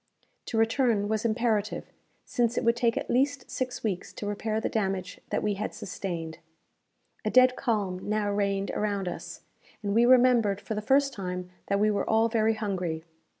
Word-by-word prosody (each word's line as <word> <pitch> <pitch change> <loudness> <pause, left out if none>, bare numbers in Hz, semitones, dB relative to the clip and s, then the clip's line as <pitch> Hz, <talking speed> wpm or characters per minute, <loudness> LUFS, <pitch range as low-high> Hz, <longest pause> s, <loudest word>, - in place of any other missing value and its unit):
To 225 - -2
return 225 -2 +2
was 220 +1 -1
imperative, 220 -2 0 0.3
since 240 -1 0
it - - +1
would 235 0 +3
take 235 -1 +1
at - - -2
least 270 +1 0
six 250 -1 -3
weeks 195 -5 -2
to - - -6
repair 215 +1 -1
the - - -1
damage 195 -4 -2
that - - -1
we 210 -1 +1
had 205 +2 -4
sustained. 170 -4 -5 0.8
A 215 - 0
dead 255 +2 +6
calm 205 -8 -1
now 210 -1 +1
reigned 200 -1 0
around 200 -3 -1
us, 175 - -6 0.4
and 200 -1 -1
we 235 +2 +5
remembered 245 -5 +5
for 220 - -5
the 210 - -2
first 275 +4 +3
time 180 -3 -5 0.2
that 200 0 +1
we 215 +1 +3
were 205 - -1
all 225 +1 +3
very 225 -1 +2
hungry. 180 -7 -2
215 Hz, 180 wpm, -28 LUFS, 200-235 Hz, 0.8 s, dead